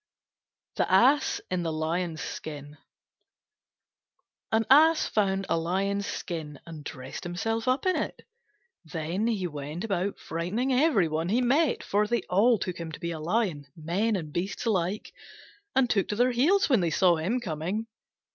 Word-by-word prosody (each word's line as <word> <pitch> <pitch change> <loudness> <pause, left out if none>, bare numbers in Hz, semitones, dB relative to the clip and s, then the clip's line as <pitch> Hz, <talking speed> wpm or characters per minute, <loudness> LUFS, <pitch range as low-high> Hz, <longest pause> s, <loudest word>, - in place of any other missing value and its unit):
THE - - +1
ASS 260 +10 +4
IN 185 -1 0
THE 165 -1 -2
LION'S 160 +1 -2
SKIN 145 -1 -7 1.8
An 220 0 +2
Ass 310 +4 +6
found 195 -2 0
a 165 - +1
Lion's 195 +4 -1
Skin, 155 -5 -5
and 160 -3 -9
dressed 130 -1 -7
himself 225 +7 -2
up 255 +5 +1
in 370 - +3
it. - - -3 0.6
Then 170 +6 -2
he 210 -6 0
went 150 +1 -5
about 195 -2 -1
frightening 195 +11 -2
every 255 - +3
one 160 +2 -2
he 230 +5 +2
met, 280 +4 +2
for 210 +1 +1
they 235 -3 0
all 220 +6 +5
took 180 -3 -4
him 165 -1 -5
to - - -7
be 170 - -3
a 160 - -5
lion, 170 -4 -1
men 185 +8 0
and 155 -6 -5
beasts 190 +7 -3
alike, 195 -2 -1 0.6
and 265 -2 +4
took 200 -5 +1
to 210 - -2
their 245 +3 +3
heels 315 +12 +3
when 255 -6 +4
they 170 -2 +1
saw 175 +1 +3
him 195 +11 0
coming. 185 +2 -3
190 Hz, 165 wpm, -27 LUFS, 165-230 Hz, 1.8 s, Ass